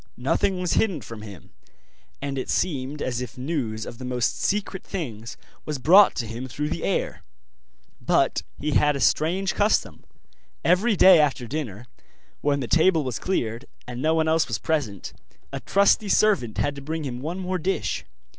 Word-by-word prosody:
Nothing 180 +9 0
was 180 -2 0
hidden 190 -10 +1
from 110 +1 -9
him, 100 -5 -11 0.7
and 140 -1 -2
it - - -5
seemed 145 -4 -1
as 125 -1 -2
if 125 -1 -7
news 125 -6 -3
of 115 - -9
the - - -7
most 125 -1 -1
secret 200 -2 -1
things 115 - -6 0.3
was 150 -1 -3
brought 185 +10 +6
to 120 - -2
him 115 +4 -6
through 150 +4 -3
the - - -4
air. - - -1 0.8
But - - +2 0.2
he 150 - -2
had 150 0 +3
a - - -3
strange 180 +8 +1
custom; 195 - 0 0.6
every 195 +6 +3
day 185 -2 +7
after 140 -4 +1
dinner, 120 -5 -5 0.6
when 140 -1 +1
the 125 - -3
table 165 +1 +3
was 130 -4 -3
cleared, 120 -9 -2 0.2
and 125 0 -6
no 160 +2 +2
one 160 -1 +1
else 160 -2 +2
was 110 -5 -2
present, 115 - -2 0.4
a - - -3
trusty 200 +1 +3
servant 190 - +2
had 145 - 0
to 140 - -9
bring 160 +3 -4
him 125 -3 -4
one 165 +6 -4
more 185 -1 -2
dish. 190 +4 -2
145 Hz, 175 wpm, -24 LUFS, 125-180 Hz, 0.8 s, day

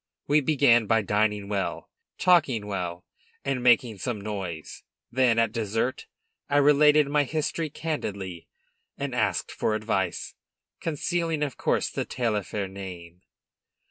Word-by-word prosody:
We 150 +1 +3
began 130 -6 +4
by 115 0 +3
dining 105 0 +1
well, 100 -1 -3 0.3
talking 150 - +3
well, 90 -3 -4 0.4
and 135 -2 -1
making 120 -3 +3
some 120 -2 -3
noise; 95 -6 -6 0.3
then, 120 -2 +3
at 115 -2 +3
dessert, 115 +3 -2 0.4
I 145 - +3
related 150 +1 +5
my 145 +1 +2
history 155 +2 -2
candidly, 100 - -4 0.5
and - - -3
asked - - 0
for 110 - 0
advice, 100 -4 -2 0.5
concealing, 165 0 -1
of 140 -3 -3
course, - - 0
the - - -2
Taillefer 105 -4 -2
name. 90 -3 -9
115 Hz, 125 wpm, -26 LUFS, 100-145 Hz, 0.5 s, related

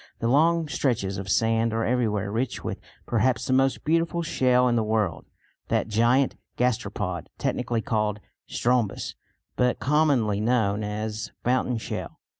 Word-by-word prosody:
The 115 - -1
long 160 +5 +3
stretches 110 -10 -1
of 95 0 -6
sand 115 +2 +2
are 115 0 0
everywhere 105 -5 0
rich 120 +3 -2
with - - -4 0.3
perhaps 120 +1 +1
the 130 - 0
most 135 0 +2
beautiful 165 +2 +1
shell 125 -5 +3
in 120 - +2
the 115 - +2
world, 105 -6 -1 0.4
that - - 0
giant 120 +5 +3 0.2
gasteropod 105 -8 -1
technically 120 -2 -1
called 105 -4 -1 0.3
Strombus 120 -4 0 0.4
but 125 -1 +2
commonly 140 -8 +2
known 110 -3 +1
as 105 +1 -4
fountain 125 0 +1
shell. - - -6
115 Hz, 140 wpm, -25 LUFS, 105-130 Hz, 0.4 s, long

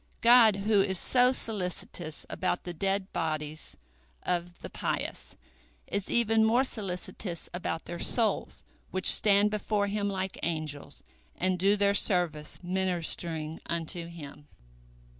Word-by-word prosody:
" - - -35
God, 235 -3 +7
who 200 +1 +2
is 190 -1 0
so 250 +6 +4
solicitous 180 -8 -5
about 185 -1 -2
the 175 - -6
dead 195 +2 -2
bodies 155 -2 -4 0.5
of 175 0 -2
the - - -6
pious, - - -4 0.5
is 200 -1 -4
even 225 -1 +3
more 235 +4 +3
solicitous 185 -5 -5
about 175 -2 -4
their 175 0 -6
souls, 230 -3 +1 0.3
which 185 0 +6
stand 205 0 +4
before 210 -1 -1
Him 205 0 -2
like 190 -1 -4
angels, 155 -3 -5 0.3
and 185 0 0
do 200 +3 +3
their 200 0 +3
service 175 -7 +1
ministering 170 -3 -2
unto 170 0 -3
Him. 150 -3 -11
185 Hz, 130 wpm, -29 LUFS, 170-205 Hz, 0.5 s, God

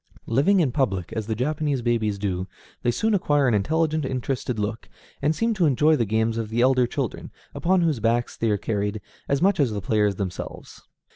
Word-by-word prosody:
[*8] - - -4
Living 185 - +4
in 140 -6 +1
public, 100 - -1
as 110 -2 -3
the 110 - -1
Japanese 145 +1 -1
babies 110 -4 0
do, 95 -2 -2 0.3
they - - +1
soon 220 - +1
acquire 145 -8 +2
an 120 - +2
intelligent, 155 +8 +1
interested 130 -2 -2
look, 105 +2 -4 0.3
and 150 +3 +1
seem 230 +4 +1
to 180 -6 +2
enjoy 150 +3 +4
the 120 - +1
games 110 +2 0
of 110 -2 -3
the 115 +2 -2
elder 125 0 +4
children, - - -4 0.2
upon 185 +1 +2
whose 160 -7 +1
backs 115 +2 0
they 115 - 0
are 105 - +2
carried, 105 0 -2 0.3
as 140 +4 +1
much 200 -1 +3
as 140 -4 +3
the 105 - -2
players 105 0 +1
themselves. 95 -2 -6
120 Hz, 205 wpm, -24 LUFS, 110-150 Hz, 0.3 s, Living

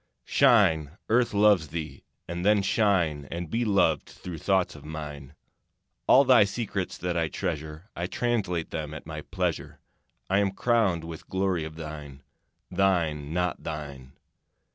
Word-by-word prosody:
Shine, 80 +1 +3
Earth 120 +2 +3
loves 100 -5 +4
thee! 80 +1 -6 0.2
And 85 +1 -4
then 105 0 +4
shine 90 -9 +1
And 85 -1 -5
be 120 +1 +1
loved 95 -8 +2
through 85 -3 -8
thoughts 95 0 +1
of 75 - -12
mine. 75 -2 -8 0.7
All 135 - +7
thy 125 -5 +6
secrets 100 -2 -3
that 90 0 -2
I 85 -1 +1
treasure 80 +6 -5
I 85 +1 -2
translate 100 -8 -1
them 75 -1 -4
at 75 - -9
my 75 -1 -6
pleasure. 90 0 -3 0.5
I 95 +1 +2
am 100 -1 +1
crowned 105 -8 +1
with 80 -1 -9
glory 95 -4 0
of 80 0 -8
thine. 75 -3 -8 0.5
Thine, 85 -6 +1
not 90 0 -1
thine. 70 -4 -7
85 Hz, 145 wpm, -27 LUFS, 75-100 Hz, 0.7 s, All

